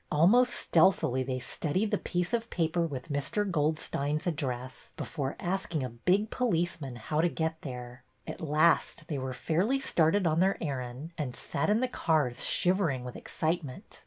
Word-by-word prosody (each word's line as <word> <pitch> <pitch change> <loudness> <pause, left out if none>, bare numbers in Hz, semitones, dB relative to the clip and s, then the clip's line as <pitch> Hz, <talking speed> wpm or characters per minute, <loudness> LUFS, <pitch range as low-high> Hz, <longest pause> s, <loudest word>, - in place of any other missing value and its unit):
Almost 205 +12 +5
stealthily 160 -6 +3
they 130 0 -2
studied 165 - -1
the 210 - +1
piece 180 +4 -2
of 230 0 0
paper 170 0 0
with 135 -1 -7
Mr. 145 +9 -1
Goldstein's 150 -3 -1
address 130 -6 -4
before 140 -3 -3
asking 175 -5 -2
a 130 - -3
big 180 - +1
police 175 -9 0
man 135 -3 -6
how 150 +7 -1
to 175 - +3
get 160 -1 -2
there. 125 -2 -7 0.2
At - - -7
last 155 +1 +2
they 145 -4 -2
were 130 0 -3
fairly 180 - 0
started 185 -6 +2
on 160 0 +2
their 190 +2 +3
errand 135 0 -4
and 130 -5 -3
sat 140 - -1
in 215 +3 +3
the 255 - +2
cars 155 - +1
shiv 185 +1 +3
ering 135 -10 0
with 125 -1 -7
excitement. 155 -5 -3
160 Hz, 170 wpm, -30 LUFS, 135-180 Hz, 0.2 s, Almost